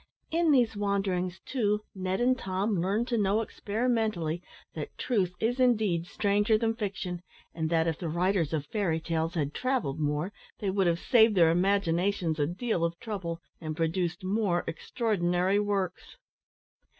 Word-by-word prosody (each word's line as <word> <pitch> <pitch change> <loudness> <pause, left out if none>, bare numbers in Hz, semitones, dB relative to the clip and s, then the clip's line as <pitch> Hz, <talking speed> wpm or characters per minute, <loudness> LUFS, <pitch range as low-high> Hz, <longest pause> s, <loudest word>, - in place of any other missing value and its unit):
In 335 0 +2
these 245 -6 +4
wanderings, 195 -3 -1
too, 210 -5 0
Ned 185 0 -2
and 255 +1 +4
Tom 190 -2 -1
learned 205 +6 0
to 235 -2 +1
know 205 +1 +2
experimentally 215 -7 -1 0.3
that - - -6
truth 190 -8 0
is 245 +3 0
indeed 215 -9 +2
stranger 205 +2 +2
than 225 0 +1
fiction, 195 -5 -4 0.3
and 160 -1 -2
that 165 -1 +2
if 165 -2 -1
the 170 - -3
writers 175 -1 +1
of 155 -3 -1
fairy 175 -3 0
tales 165 +1 -2
had 150 -3 -1
travelled 255 - -1
more 150 +6 -1 0.2
they 200 -2 -1
would 190 -1 +2
have 170 -1 +2
saved 220 -1 +5
their 165 -3 +6
imaginations 180 -2 +1
a 145 - +2
deal 180 +1 -1
of 170 0 -1
trouble, 175 -6 -4 0.2
and 155 -1 -4
produced 175 +3 -1
more 190 -2 +1
extraordinary 185 -1 0
works. 200 - -2
190 Hz, 155 wpm, -29 LUFS, 170-215 Hz, 0.3 s, their